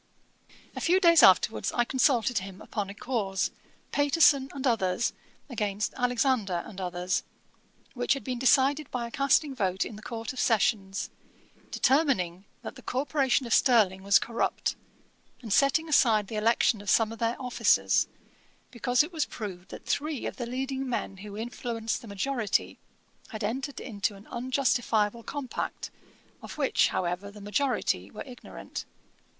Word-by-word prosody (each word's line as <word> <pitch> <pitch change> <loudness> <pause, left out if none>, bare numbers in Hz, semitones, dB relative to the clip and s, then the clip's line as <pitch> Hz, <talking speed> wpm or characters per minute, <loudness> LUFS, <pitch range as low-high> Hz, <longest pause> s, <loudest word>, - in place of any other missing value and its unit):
A - - -5
few 360 +3 +3
days 335 -4 +6
afterwards 190 +4 +5
I 240 - +2
consulted 250 -3 +2
him 190 0 -9
upon 205 -2 -4
a 200 - -8
cause, 205 -6 -1 0.4
Paterson 285 -2 +4
and 275 -1 -5
others 225 -3 +1 0.3
against 210 -5 -2
Alexander 245 -7 0
and 195 -3 -9
others, 180 0 -1 0.7
which 245 +2 +1
had 275 - -7
been 250 -2 -3
decided 275 +3 +3
by 245 -2 -3
a 235 - -8
casting 275 +1 +2
vote 190 -6 -1
in 215 - -8
the - - -11
Court 225 0 -5
of 255 - -7
Session, 210 -3 +2 0.8
determining 205 - +1 0.2
that - - -6
the - - -13
Corporation 270 0 0
of 235 - -1
Stirling 215 -8 +4
was 200 +1 +5
corrupt, 230 0 -1 0.7
and 220 -4 -2
setting 280 +6 +3
aside 225 -9 +3
the 225 - -5
election 220 0 +2
of 205 - -5
some 225 +1 +3
of 225 - -9
their 230 0 -1
officers, 250 -2 +2 0.6
because 245 +2 +2
it 335 +4 -8
was 315 -4 0
proved 190 -4 -7
that - - -10
three 300 -2 -2
of - - -5
the 240 - -4
leading 265 +1 -3
men 215 -5 -3
who 205 +1 -9
influenced 230 0 -3
the 235 - -11
majority 215 +1 -1 0.5
had 215 -1 -7
entered 265 +6 -3
into 205 -1 -3
an 195 +2 -14
unjustifiable 240 -3 0
compact, 275 +1 -5 0.5
of - - -9
which, - - +3
however, 180 +3 -2
the 205 +1 -12
majority 205 - -1
were - - -8
ignorant. 250 -2 -8
235 Hz, 155 wpm, -28 LUFS, 205-265 Hz, 0.8 s, days